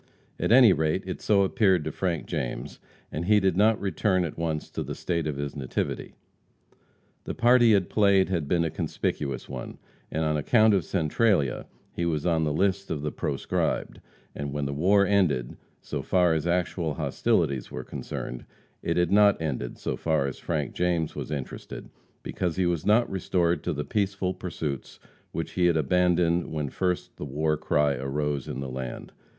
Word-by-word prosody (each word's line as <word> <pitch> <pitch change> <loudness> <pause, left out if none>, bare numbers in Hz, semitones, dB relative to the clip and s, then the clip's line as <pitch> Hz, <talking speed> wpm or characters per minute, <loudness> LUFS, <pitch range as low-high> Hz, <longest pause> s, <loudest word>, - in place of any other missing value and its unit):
At - - 0
any 120 -5 +8
rate, 80 +4 0
it 95 - -5
so 100 -2 +3
appeared 95 -4 +3
to 80 - -3
Frank 85 0 -2
James, - - -4 0.3
and 80 +3 -3
he 105 +2 +5
did 95 -3 +1
not 105 +3 +4
return 95 -2 +1
at 80 - -5
once 80 -2 -3
to - - -4
the - - -5
State 85 -3 -2
of 75 -2 -3
his 70 -1 -4
nativity. 65 -3 -3 1.1
The - - -4
part 120 +1 +5
he 115 -2 +6
had 95 -3 +2
played 100 -3 +4
had 85 -6 -1
been 85 +2 +2
a 80 - -2
conspicuous 70 -2 -3
one, - - -7 0.3
and, 80 - -1
on 75 0 +1
account 110 +8 +4
of 95 -4 +2
Centralia, 85 - +1 0.3
he 85 - -3
was 75 -3 -1
on 80 -2 +2
the 75 - 0
list 100 +4 0
of 75 -3 -3
the 75 - -1
proscribed, 70 -2 -2 0.3
and 70 -1 -5
when 75 0 -2
the 70 - -2
war 100 +7 +4
ended, 90 -11 +1 0.3
so - - -4
far 90 -3 +3
as 80 +1 -1
actual 85 -3 0
hostilities 65 -1 0
were - - -6
concerned, 60 - -6 0.4
it 85 - -1
had 90 - +2
not 105 0 +5
ended, 70 -6 -3
so - - -3
far 80 -4 0
as 70 - -4
Frank 75 -5 -2
James 85 -3 0
was - - -5
interested, 70 -4 -6 0.3
because 90 -3 -2
he 95 - +1
was 85 -1 -1
not 110 +3 +4
restored 90 -2 0
to - - -1
the 75 - -3
peaceful 100 -3 -1
pursuits 80 -7 -5 0.3
which - - -4
he 90 -1 +2
had 85 -2 +3
abandoned 85 +2 +2
when 75 -3 -3
first 90 -2 -2
the - - -6
war 75 +3 0
cry 75 -1 +1
arose 70 +1 -2
in - - -4
the 70 - -4
land. 65 -1 -6
85 Hz, 185 wpm, -27 LUFS, 75-95 Hz, 1.1 s, any